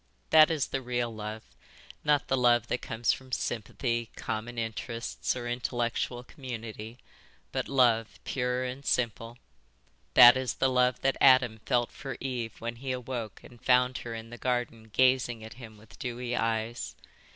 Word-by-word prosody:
That 155 -1 +8
is 155 -4 0
the 135 - -2
real 120 -2 -2
love, 110 0 -6 0.6
not 150 -3 +2
the 135 - +2
love 120 -2 +3
that 125 - -1
comes 115 +1 0
from 130 -1 -10
sympathy, 115 0 -2
common 115 +2 -4
interests, 115 +2 -3
or 120 -1 -5
intellectual 120 0 -2
community, 115 -4 -8 0.5
but - - -2
love 120 -4 +2
pure 125 -1 -1
and 130 +2 -5
simple. 120 -2 -1 0.8
That 120 0 +10
is 130 -2 -2
the 135 - +2
love 125 -1 +2
that 135 0 +1
Adam 130 -4 +6
felt 120 -1 +1
for 135 - -7
Eve 120 -4 -4
when 115 +1 -5
he 130 +2 -4
awoke 125 -4 -5
and 120 -1 -15
found 125 0 +3
her 115 -1 -6
in 115 0 -8
the 120 - -9
garden 120 -3 -2
gazing 125 -2 +2
at 110 - -9
him 110 -2 -11
with 105 0 -17
dewy 125 -2 -3
eyes. 115 0 -2
120 Hz, 160 wpm, -29 LUFS, 115-130 Hz, 0.8 s, That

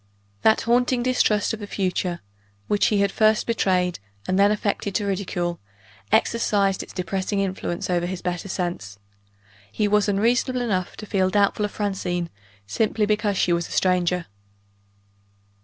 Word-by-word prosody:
That 220 - +4
haunting 245 +1 +2
distrust 225 -4 +2
of 225 - -4
the 205 - -7
future, 180 -3 -2 0.5
which 205 - +2
he 205 -2 +2
had 200 -1 +2
first 215 0 +3
betrayed 185 -6 +1 0.3
and 185 +1 +1
then 200 +1 +5
affected 205 -1 -2
to 210 - 0
ridicule, 180 -3 -2 0.5
exercised 200 -4 +2
its - - -10
depressing 190 +2 -2
influence 190 -3 -2
over 175 -1 0
his 185 0 -5
better 180 +1 -3
sense. 175 - -4 0.7
He 210 - 0
was 210 0 +2
unreasonable 245 +5 +1
enough 190 -7 -2
to 215 - -7
feel 190 -2 +1
doubtful 205 +1 +2
of 205 - -5
Francine, 180 -4 -2 0.3
simply 215 - 0
because 210 -1 0
she 175 - +2
was 170 0 -1
a - - -13
stranger. 180 -1 +1
200 Hz, 150 wpm, -23 LUFS, 180-210 Hz, 0.7 s, then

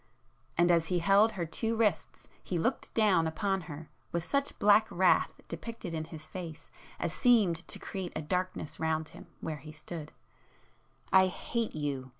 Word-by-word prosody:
and 175 +1 +5
as 165 -1 +3
he 180 - +1
held 200 +5 +5
her 180 -4 -2
two 225 +8 -1
wrists 205 -9 0 0.2
he 180 - -2
looked 235 +11 -1
down 200 -7 +4
upon 195 +3 0
her 155 -2 -8 0.2
with 170 0 -2
such 280 +5 -1
black 210 +1 +5
wrath 185 0 +3 0.2
depicted 180 +1 -6
in 160 -1 -2
his 155 -1 -10
face 165 -2 -8 0.3
as 170 -2 -2
seemed 215 -9 +4
to - - -5
create 190 -3 -5
a - - -2
darkness 180 -1 -2
round 160 -1 0
him - - -13
where 155 -1 -3
he 150 +2 -10
stood,—"I 165 +4 -3
hate 230 +3 -3
you! 140 -4 -3
175 Hz, 160 wpm, -31 LUFS, 160-200 Hz, 0.3 s, and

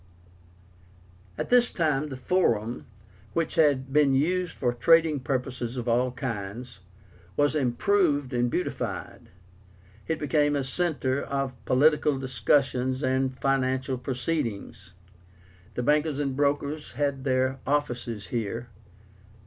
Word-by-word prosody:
At - - -3
this 245 -1 +5
time 150 -4 0
the 135 - -5
FORUM, 120 - 0 0.5
which 165 -2 -1
had 135 -4 +2
been 145 -2 +4
used 175 +5 0
for 120 -2 0
trading 160 +3 +4
purposes 125 -1 -3
of 120 -1 -4
all 125 +2 +2
kinds, 115 -1 -5 0.6
was 145 0 +3
improved 145 +1 +1
and 120 0 +1
beautified. 180 - -4 0.8
It 160 - 0
became 145 0 +1
a 140 - 0
centre 140 -2 -1
for 135 -2 -2
political 150 +1 +3
discussions 130 +1 +1
and 130 0 0
financial 130 -1 0
proceedings. 120 - -3 0.8
The 125 - -2
bankers 150 +2 +2
and 140 -2 -1
brokers 145 +2 -1
had 140 -2 -1
their 130 0 +1
offices 120 -7 -2
here. 115 +1 -3
135 Hz, 115 wpm, -27 LUFS, 125-150 Hz, 0.8 s, this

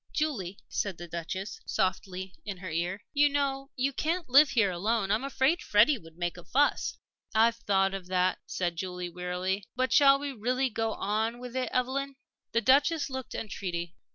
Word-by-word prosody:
"Julie," 210 - -1
said 195 -4 -2
the 175 - -8
Duchess, 170 +4 -5
softly, 185 0 -2
in 200 -3 -5
her 185 -1 -7
ear, 175 +5 -2
"you 290 0 +5
know 275 -1 -1
you 275 +2 0
can't 330 +5 -1
live 275 +3 +7
here 225 -6 +3
alone. 200 +3 0
I'm 215 +5 +1
afraid 275 +5 +1
Freddie 230 +6 +4
would 165 -3 -16
make 175 0 -2
a 175 - -10
fuss." 285 +9 +1 0.4
"I've 230 +1 +4
thought 195 -3 +1
of 190 -2 -6
that," 185 0 +1
said 175 -2 -2
Julie, 180 0 -4
wearily. 180 +3 -2
"But, 255 +1 +1
shall 275 -1 +7
we 285 0 -4
really 255 +2 0
go 225 0 -1
on 220 +3 -1
with 250 0 -8
it, 255 -2 -1
Evelyn?" 270 +2 -1 0.4
The 230 - +2
Duchess 285 +5 +3
looked 260 -2 -5
entreaty. 175 -5 -4
220 Hz, 180 wpm, -29 LUFS, 185-265 Hz, 0.4 s, live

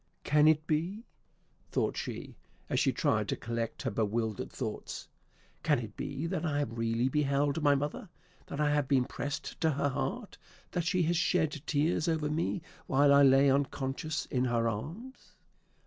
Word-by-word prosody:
"Can 150 +1 +4
it 155 0 +4
be," 175 +9 -1 0.7
thought - - 0
she, - - -5 0.4
as - - +2
she - - +3
tried - - +1
to - - +1
collect 115 0 -4
her 130 - -1
bewildered 110 0 -1
thoughts, - - -5 0.5
"can - - +3
it - - -6
be 145 +4 -4
that 170 -1 -2
I 155 -4 0
have 120 -6 -2
really 115 +1 +1
beheld 140 +2 +1
my 145 -1 +5
mother, 145 +7 -3 0.4
that 140 - -6
I 150 -1 +3
have 145 -2 +1
been 130 -2 +3
pressed 145 +2 -5
to 160 - +4
her 145 -1 +1
heart, 140 - -4 0.3
that 175 -3 -1
she 180 0 +2
has 170 +1 +1
shed 165 -2 +2 0.2
tears 155 +2 +1
over 155 -2 0
me 165 +2 -1 0.2
while 140 -2 +5
I 140 - +7
lay 135 0 +6
unconscious 140 +2 -1
in 125 -1 0
her 120 -2 +1
arms? 170 - -6
145 Hz, 170 wpm, -31 LUFS, 130-160 Hz, 0.7 s, I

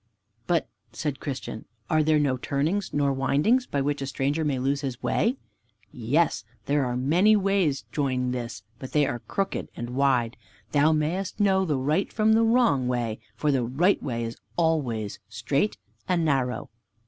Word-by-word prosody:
"But," 170 -2 +1 0.3
said 145 -3 -3
Christian, 130 -5 -5 0.2
"are 155 - +3
there 155 0 +3
no 145 -3 +2
turnings, 150 +10 -1
nor 140 -1 +1
windings, 150 - +2
by 140 - -1
which 145 +1 -1
a 135 - -3
stranger 140 +3 -1
may 145 -3 0
lose 135 +2 0
his 130 -3 -5
way?" 245 +5 +1 0.5
"Yes, 125 -1 +1 0.2
there 145 -1 +1
are 125 0 -2
many 175 +12 +4
ways 195 -8 +1
join 130 -3 0
this, 120 -7 -5 0.2
but 130 - -8
they 150 -1 +4
are 120 -2 -2
crooked 195 - -3
and 120 +1 -5
wide. 125 -3 +1 0.3
Thou 150 +2 +4
mayest 165 +7 -1
know 190 -2 +3
the 150 -5 0
right 150 +9 0
from 220 0 +3
the 225 - +4
wrong 225 - +3
way, 120 -3 -1 0.2
for 150 +3 +1
the 130 -3 +1
right 150 +12 +2
way 120 -4 -3
is 115 0 -5 0.2
always 135 -11 0
strait 130 - -1 0.3
and 175 -3 +1
narrow." 130 -4 0
140 Hz, 170 wpm, -26 LUFS, 125-170 Hz, 0.5 s, many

